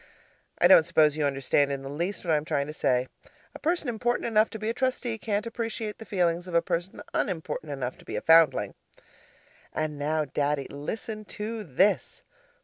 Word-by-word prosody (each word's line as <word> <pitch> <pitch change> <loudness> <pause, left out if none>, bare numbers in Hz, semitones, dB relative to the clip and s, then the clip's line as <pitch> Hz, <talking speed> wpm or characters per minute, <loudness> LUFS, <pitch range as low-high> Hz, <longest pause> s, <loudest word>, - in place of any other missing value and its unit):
I - - +6
don't - - +9
suppose 155 -2 +3
you 155 -1 0
understand 140 +1 +1
in 135 -1 -3
the - - -6
least 170 +8 -3
what 165 - +2
I - - +4
am 150 - -2
trying 140 -2 -1
to 150 - -7
say. 125 -4 +1 0.5
A - - -10
person 330 -1 0
important 240 +1 -1
enough 220 -1 +3
to 220 - -7
be 215 0 -4
a 225 - 0
Trustee 250 -2 -1
can't 210 0 -1
appreciate 225 -2 -4
the 225 - -10
feelings 175 -2 0
of 175 - -5
a - - +7
person 175 +5 -3
unimportant 160 -4 -2
enough 130 -3 -4
to - - -17
be - - -5
a - - -2
foundling. 165 -1 +5 1.0
And 155 -1 -3
now, 155 +1 0
Daddy, 145 0 -1
listen 215 +9 -5
to 215 +2 -5
this. 185 +5 +1
170 Hz, 195 wpm, -27 LUFS, 145-220 Hz, 1.0 s, don't